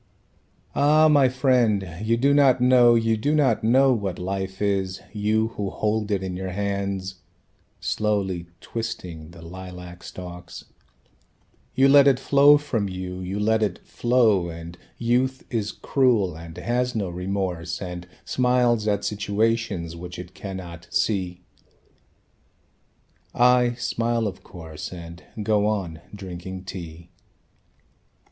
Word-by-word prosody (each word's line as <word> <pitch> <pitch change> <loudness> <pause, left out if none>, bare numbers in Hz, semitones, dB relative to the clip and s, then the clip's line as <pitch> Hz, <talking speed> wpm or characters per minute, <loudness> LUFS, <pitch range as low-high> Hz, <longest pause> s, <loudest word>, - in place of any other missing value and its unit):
"Ah, 150 +2 +5
my 145 -4 +5
friend, 125 -7 +2 0.2
you 115 +1 +2
do 140 +4 +3
not 140 -3 +5
know, 125 -1 +6
you 115 -1 +2
do 145 +8 0
not 130 -7 +2
know 130 +4 +5
What 100 -6 -2
life 95 +1 -4
is, 95 -2 0
you 110 +1 +1
should 100 -2 -2
hold 110 0 -1
it 100 -2 0
in 95 -1 -4
your 95 +1 -4
hands"; 100 -1 -3 0.6
(Slowly 95 -5 -1
twisting 85 -8 -6
the 85 -1 -13
lilac 90 0 -9
stalks) 90 -1 -9 1.1
"You 135 +1 +5
let 140 0 +7
it 135 -2 +4
flow 140 +2 +6
from 115 -9 -2
you, 90 0 -5
you 95 +2 -4
let 110 +1 +2
it 100 -5 0
flow, 115 -7 +2
And 85 +1 -8 0.2
youth 125 +3 0
is 110 -3 -1
cruel, 115 - +1
and 80 +1 -10
has 125 +5 -1
no 105 -4 -1
remorse 90 -2 -3
And 90 -1 -6 0.2
smiles 125 -3 +2
at 100 -1 0
situations 105 -4 -1
which 90 +1 -8
it 90 +1 -9
cannot 90 -2 -8
see." 90 -4 -1 1.9
I 125 0 +4
smile, 115 -1 -1
of 95 -3 -4
course, 80 -4 -8
And 85 -1 -9 0.2
go 105 0 +2
on 90 -7 -2
drinking 95 -1 -7
tea. 85 -3 -9
100 Hz, 130 wpm, -24 LUFS, 90-120 Hz, 1.9 s, let